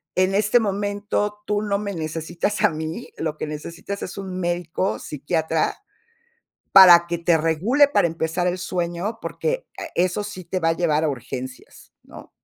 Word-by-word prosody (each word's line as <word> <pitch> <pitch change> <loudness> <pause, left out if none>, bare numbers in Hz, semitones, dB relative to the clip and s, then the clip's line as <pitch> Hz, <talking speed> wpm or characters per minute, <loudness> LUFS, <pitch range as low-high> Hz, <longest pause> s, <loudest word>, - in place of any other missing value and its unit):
En 185 +1 +2
este 210 +4 +3
momento 205 0 -2
tú 210 0 0
no 205 -1 0
me 200 -1 -4
necesitas 165 +5 -3
a - - +6
mí, 160 +8 -5
lo 155 -1 -2
que - - -3
necesitas 165 +6 -6
es 185 - -6
un 190 -2 -5
médico 175 +1 -1
psiquiatra 160 +2 -1 1.0
para 175 -3 +9
que 170 - -2
te 170 -1 +2
regule 190 - +3
para 285 - +3
empezar 165 +1 -1
el 180 +1 0
sueño, 180 +4 -3
porque, - - -3
a - - -4
eso 180 +3 +1
sí 205 -3 -7
te 185 +2 -3
va 165 - +2
a - - +4
llevar 160 -3 +1
a - - +2
urgencias", 130 -1 -7
¿no? - - -13
175 Hz, 170 wpm, -23 LUFS, 160-205 Hz, 1.0 s, para